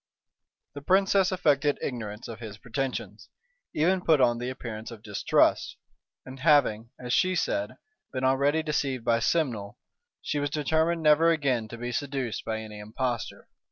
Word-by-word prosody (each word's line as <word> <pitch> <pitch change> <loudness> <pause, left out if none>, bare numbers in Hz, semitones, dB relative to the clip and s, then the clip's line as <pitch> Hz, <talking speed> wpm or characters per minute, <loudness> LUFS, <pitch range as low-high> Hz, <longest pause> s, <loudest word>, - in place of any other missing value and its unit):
The 145 - -8
princess 190 +3 +3
affected 145 -5 +2
ignorance 110 -4 -5
of 115 -1 -8
his 110 -3 -8
pretensions; 125 +4 -4 0.5
even 180 +5 +2
put 160 -4 +4
on 120 -2 +3
the 125 +1 -3
appearance 115 -4 -7
of 115 -3 -11
distrust: 105 -2 +1 0.5
and 130 0 -10
having, 130 -7 +3
as 125 0 -3
she 185 0 +3
said, 300 - -1 0.3
been 130 -1 -4
already 140 +4 +2
deceived 140 -5 -2
by 115 0 +3
Simnel, 115 -7 -1 0.4
she 150 - -2
was 145 0 -1
determined 160 +3 0
never 155 +2 +5
again 135 -8 +1
to 120 - -9
be 120 +1 -4
seduced 135 -2 -3
by 110 0 -3
any 105 -1 -9
impostor. 115 +2 -4
130 Hz, 155 wpm, -27 LUFS, 115-155 Hz, 0.5 s, never